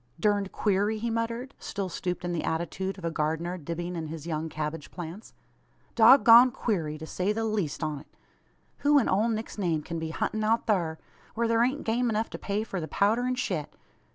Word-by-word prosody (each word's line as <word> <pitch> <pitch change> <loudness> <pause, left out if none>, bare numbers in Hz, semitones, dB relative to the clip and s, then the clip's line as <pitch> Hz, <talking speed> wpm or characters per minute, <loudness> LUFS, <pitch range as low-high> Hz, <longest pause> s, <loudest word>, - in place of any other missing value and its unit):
"Durned 205 +1 +1
queery!" 205 +1 +1
he 230 +2 -2
muttered, 230 +3 -3
still 200 -1 -4
stooped 180 0 -4
in 175 - -2
the 170 - -2
attitude 185 +4 -2
of 185 - -7
a 165 - 0
gardener 160 +3 -1
dibbing 175 +2 -5
in 160 -2 -4
his 155 -1 -7
young 160 -1 -3
cabbage 150 0 -4
plants. 175 +5 -8 0.6
"Dog 240 +4 +7
goned 240 +2 +8
queery, 160 -9 -1
to 155 - -8
say 185 +5 -1
the 225 +1 -1
leest 205 -9 -2
on't. 150 -2 -4 0.7
Who 290 0 +4
in 275 - +3
ole 210 +5 +2
Nick's 220 -1 -4
name 165 -5 0
kin 165 +1 -4
be 160 0 -4
huntin' 215 +6 -2
out 225 +2 +2
thur 170 -7 +1 0.4
whar 230 +1 +1
theer 230 0 +3
ain't 260 +5 +1
game 240 +2 +1
enuf 220 0 -1
to - - -6
pay 205 +1 -1
for 195 -5 -4
the 160 - -4
powder 220 +8 +2
an 255 - 0
shet? 180 - -3
195 Hz, 205 wpm, -28 LUFS, 165-225 Hz, 0.7 s, goned